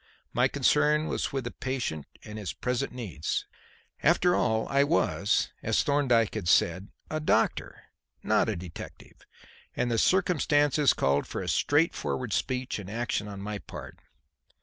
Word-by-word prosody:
My 125 +1 +3
concern 150 +3 +2
was - - -2
with 135 -2 -2
the 120 - -5
patient 125 - -4 0.2
and 105 0 -8
his 95 -5 -4
present 125 0 -2
needs. 105 -12 -3 0.6
After 175 +3 +4
all, 110 -2 +1
I 140 0 +3
was, 140 - +1
as - - +1
Thorndyke 130 -6 +2
had 105 -6 -4
said, 90 +2 +3 0.2
a 155 - -1
doctor, 155 - 0 0.4
not - - +2
a - - -1
detective, 85 -1 -10 0.5
and 120 - 0
the 115 - +2
circumstances 150 -6 +3
called 70 +1 +1
for - - -5
straightforward 145 -6 +1
speech 130 -3 -2
and 100 -2 -8
action 110 -1 -2
on 100 -1 -7
my 105 0 -4
part. - - -10
125 Hz, 145 wpm, -28 LUFS, 105-145 Hz, 0.6 s, After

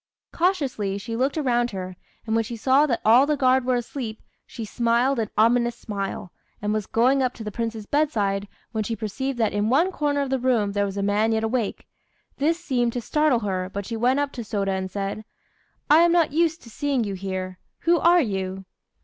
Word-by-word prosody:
Cautiously 275 - 0
she 225 +3 -5
looked 265 +6 0
around 240 -5 +1
her; 185 -3 -6 0.3
and 220 - -2
when 225 0 +2
she 235 +1 -6
saw 265 +6 +4
that 240 -5 -1
all 240 +6 +6
the 300 -1 +1
guard 260 -1 +3
were 255 0 +2
asleep, 240 -2 -4 0.3
she 225 - -7
smiled 235 +4 +1
an 220 -2 -1
ominous 235 +2 +3
smile, 195 -3 -5 0.3
and 210 +1 -1
was 215 -2 -2
going 255 +4 +3
up 255 -1 0
to 225 - -8
the 210 - -5
Prince's 225 -1 -4
bedside, 205 -9 0 0.2
when 220 -2 -1
she 225 +2 -3
perceived 250 +5 -3
that 225 -3 +1
in 205 +1 0
one 325 +9 +3
corner 290 -4 0
of 275 -2 -3
the 265 - +1
room 235 -5 +1
there 200 0 0
was 195 0 -6
a 200 - -1
man 210 +2 +2
yet 220 0 0
awake. 225 -1 -2 0.5
This 325 +4 +1
seemed 245 -8 0
to 245 - -2
startle 300 0 +2
her, 185 -3 -2
but 200 0 -4
she 230 - -4
went 250 +5 +2
up 285 -1 -1
to 245 - -6
Sôda 200 -3 -1
and 190 0 -3
said 200 +2 -4 0.6
"I 305 - +6
am 340 0 +5
not 335 -4 +3
used 330 0 +1
to 230 - -13
seeing 275 -1 0
you 200 -2 -3
here. 185 -1 -5 0.2
Who 340 0 +3
are 345 +1 +5
you?" 190 -5 -3
235 Hz, 215 wpm, -24 LUFS, 205-275 Hz, 0.6 s, all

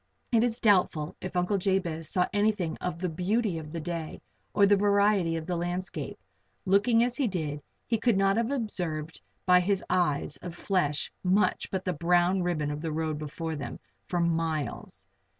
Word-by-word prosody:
It 230 -1 +4
is 240 -1 0
doubtful 180 -8 +2
if 185 0 -6
Uncle 180 +3 +1
Jabez 175 -4 -1
saw 180 -2 +2
anything 205 -6 +1
of 180 -2 -3
the 180 +2 -2
beauty 185 +2 0
of 155 -1 -9
the 165 - -4
day 165 -1 -5 0.3
or 200 - +5
the 205 +1 +5
variety 200 -3 +3
of 160 - -5
the 180 - -2
landscape. 175 -3 -3 0.5
Looking 210 +5 +4
as 245 0 -1
he 275 -4 +2
did 155 -7 -3 0.2
he 230 -1 0
could 230 -3 +2
not 195 0 +3
have 230 +1 +1
observed 175 - -3 0.2
by 180 -1 +6
his 195 +1 0
eyes 150 -6 +1
of 175 +3 -8
flesh 175 -6 0
much 190 +3 +2
but 190 -1 -3
the 180 - 0
brown 175 +3 +2
ribbon 155 -5 -1
of 150 +2 -5
road 155 -1 -2
before 160 +2 -4
them, 145 - -5 0.3
for 175 - -1
miles. 165 -4 -2
180 Hz, 175 wpm, -28 LUFS, 160-200 Hz, 0.5 s, by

